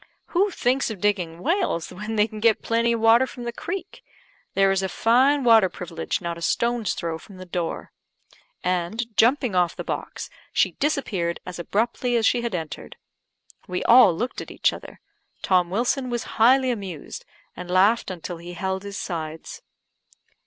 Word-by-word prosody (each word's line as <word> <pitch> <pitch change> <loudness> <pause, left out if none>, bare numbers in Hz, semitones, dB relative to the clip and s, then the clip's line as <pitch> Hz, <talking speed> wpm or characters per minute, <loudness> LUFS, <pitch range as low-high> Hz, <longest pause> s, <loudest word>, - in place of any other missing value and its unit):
"Who 385 +4 +2
thinks 265 -7 0
of 215 -4 -6
digging 180 -5 -1
wells 335 - 0
when 210 +4 -5
they 210 -1 +4
can 215 -1 -9
get 225 0 +3
plenty 230 +1 +1
of 230 - -2
water 230 +3 +5
from 245 - -9
the 235 0 -4
creek? 370 +9 -6 0.5
There 195 0 +4
is 195 0 +1
a 190 - -2
fine 260 +8 +3
water 225 -5 +6
privilege 165 -2 -4
not 170 -1 -4
a - - -13
stone's 235 +3 0
throw 165 -1 -4
from 195 +3 -14
the 185 - -9
door," 175 -2 -4 0.7
and, 195 +6 -2
jumping 245 0 +3
off 180 -2 +2
the - - -5
box, - - -5 0.2
she - - +2
disappeared 210 - -1
as 180 -1 -7
abruptly 235 +7 -1
as 230 -1 +2
she 245 - +3
had 235 -5 -2
entered. 160 -3 -6 0.7
We 180 0 -3
all 240 -5 +7
looked 245 +8 -3
at - - -9
each - - +1
other; - - -10 0.4
Tom 180 -2 +3
Wilson 245 +6 0
was 240 -1 -2 0.2
highly 260 +2 +5
amused, 190 -9 -6 0.3
and 180 0 -8
laughed 195 +6 +3
until 175 -1 -6
he 175 +1 -9
held 190 +2 -3
his 200 0 -7
sides. 160 -2 -6
210 Hz, 175 wpm, -24 LUFS, 180-240 Hz, 0.7 s, all